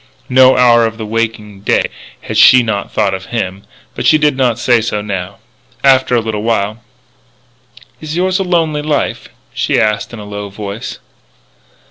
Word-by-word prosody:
No 130 0 +5
hour 120 -2 +5
of 110 0 -7
the 110 - -5
waking 110 -2 -3
day - - +1 0.4
that - - -4
she 130 - +7
had 125 - +3
not 100 -3 -3
thought 100 -2 0
of 95 0 -6
him. 100 -4 -4 0.3
But - - -2
she 155 - +6
did 150 -2 +2
not 125 -3 +1
say 120 -1 +2
so 110 -2 -2
now. 100 -2 -5 0.5
After 130 -2 +4
a - - +3
little 110 -2 -3
while: 110 -1 -1 1.2
"Is 155 0 -6
yours 185 +2 0
a - - 0
lonely 165 -5 0
life?" 150 0 -2 0.2
she - - 0
asked 105 -2 0
in 120 - -8
a 105 - -9
low 105 0 -6
voice. 100 +2 -7
115 Hz, 175 wpm, -14 LUFS, 105-130 Hz, 1.2 s, she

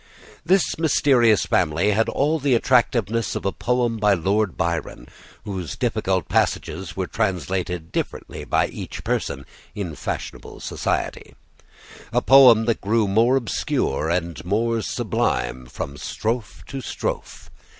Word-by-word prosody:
This 180 0 +2
mysterious 130 - +4
family 85 +4 +2
had 110 +2 +2
all 155 +3 +1
the 140 -3 +2
attractiveness 115 -3 +1
of - - -4
a 95 - +1
poem 120 0 0
by 105 -2 +3
Lord 100 +3 0
Byron, 85 -1 -2 0.4
whose 95 -8 -4
difficult - - -1
passages 90 +4 -1
were 95 - 0
translated 90 -4 -2
differently - - -4
by - - +2
each - - -7
person 70 0 -2 0.3
in 95 -6 -4
fashionable 70 - -6
society; - - -3 0.8
a - - +3
poem 125 -4 +7
that 115 -1 0
grew 110 +1 +2
more 115 +6 +3
obscure 85 - -1
and 85 -3 -2
more 115 +5 0
sublime 65 - -1
from 70 +2 -6
strophe 110 - -3
to 135 - -6
strophe. - - -5
105 Hz, 130 wpm, -23 LUFS, 90-120 Hz, 0.8 s, poem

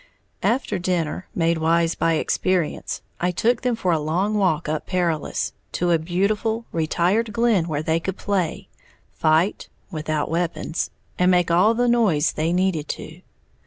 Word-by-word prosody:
After 250 -3 0
dinner, 175 -1 -1
made 165 -1 +1
wise 165 +1 +2
by 165 - +1
experience, 175 +1 -1 0.2
I 180 - +1
took 225 +7 +1
them 250 -2 +1
for 185 -5 0
a 160 - +2
long 175 +8 0
walk 180 -7 +1
up 155 0 -2
Perilous, 170 -5 -1 0.2
to 175 0 +1
a 165 - +4
beautiful, 210 +7 0
retired 180 +7 +1
glen 220 -6 +2
where 150 -2 -2
they 160 0 +1
could 190 +3 -4
play, 190 -5 -2 0.4
fight 160 +6 +1 0.2
(without 155 -2 -2
weapons) 170 -1 -2 0.3
and 180 0 +4
make 180 -2 +3
all 195 +7 +4
the 245 +1 +2
noise 210 -11 +3
they 160 +2 -1
needed 180 -4 0
to. - - -7
175 Hz, 155 wpm, -23 LUFS, 160-200 Hz, 0.4 s, a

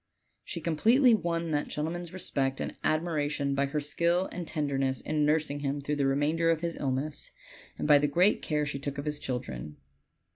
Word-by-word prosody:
She 170 - -6
completely 230 - +4
Avon 170 -5 0
that 145 -1 0
gentleman's 165 +3 -4
respect 135 -7 -1
and - - -4
admiration 150 -3 0
by 140 0 +1
her 150 +2 -1
skill 170 +5 +1
and 175 -2 -5
tenderness 135 -4 0
in 150 -1 0
nursing 150 -2 +1
him 140 0 -1
during 145 +1 -2
the 140 -1 +2
remainder 150 +5 +2
of 165 -1 +2
his 170 -1 -2
illness, 140 +2 -2 0.5
and - - -2
by 145 -1 +7
the 145 - +2
great 180 +8 +3
care 150 -1 0
she 140 -1 -3
took 140 0 -5
of 140 - -4
his 150 -1 -2
children. 75 - -5
150 Hz, 185 wpm, -29 LUFS, 140-165 Hz, 0.5 s, by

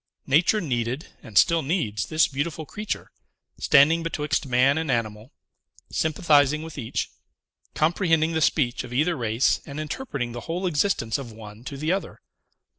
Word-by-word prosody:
Nature 170 +10 +3
needed, 125 - -2
and 110 -4 -6
still 165 -1 +5
needs, 135 - -1
this 155 0 +3
beautiful 155 +3 -3
creature; 210 +8 -5 0.5
standing 155 +3 +5
betwixt 150 -4 -2
man 130 +2 +4
and 160 -2 -3
animal, 115 -1 -2 0.6
sympathizing 150 -2 +2
with 160 -1 -9
each, 120 -6 -3 0.6
comprehending 165 0 +2
the 160 -1 -1
speech 135 -4 +1
of 125 - -10
either 155 +7 +2
race, 115 -1 +1
and 140 +1 -8
interpreting 150 - -4
the 120 - -6
whole 180 +3 -2
existence 150 - 0
of 125 -4 -8
one 110 0 -11
to 140 +2 -7
the 155 +4 -1
other. 195 +1 -3
145 Hz, 150 wpm, -25 LUFS, 125-165 Hz, 0.6 s, still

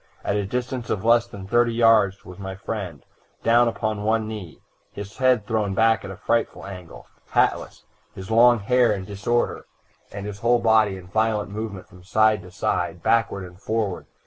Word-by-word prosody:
At - - -1
a 100 -2 -1
distance 125 +1 -4
of 105 +1 -2
less 120 +1 +4
than 100 -5 -10
thirty 120 +3 +2
yards 110 -4 +3
was 90 +1 -11
my 95 -1 -6
friend, 95 -7 -6 0.4
down 120 +1 +4
upon 110 -2 -2
one 110 +1 0
knee, 105 -7 -8 0.3
his 100 +1 -9
head 125 -5 +3
thrown 105 -3 -1
back 110 +1 +3
at - - -7
a 95 - -8
frightful 115 +3 -1
angle, 90 -3 -10 0.3
hatless, - - 0 0.3
his 95 +3 -8
long 120 +2 +6
hair 125 +3 +3
in 95 -2 -3
disorder 105 +4 -2 0.4
and 100 0 -7
his 105 -1 -6
whole 120 +2 +3
body 110 -4 +3
in 90 - -11
violent 105 0 0
movement 105 -3 -6
from 90 -3 -17
side 110 +2 +2
to 90 - -12
side, 90 - -2
backward 105 -4 +1
and 90 +1 -14
forward. 110 -5 -2
105 Hz, 180 wpm, -23 LUFS, 100-115 Hz, 0.4 s, long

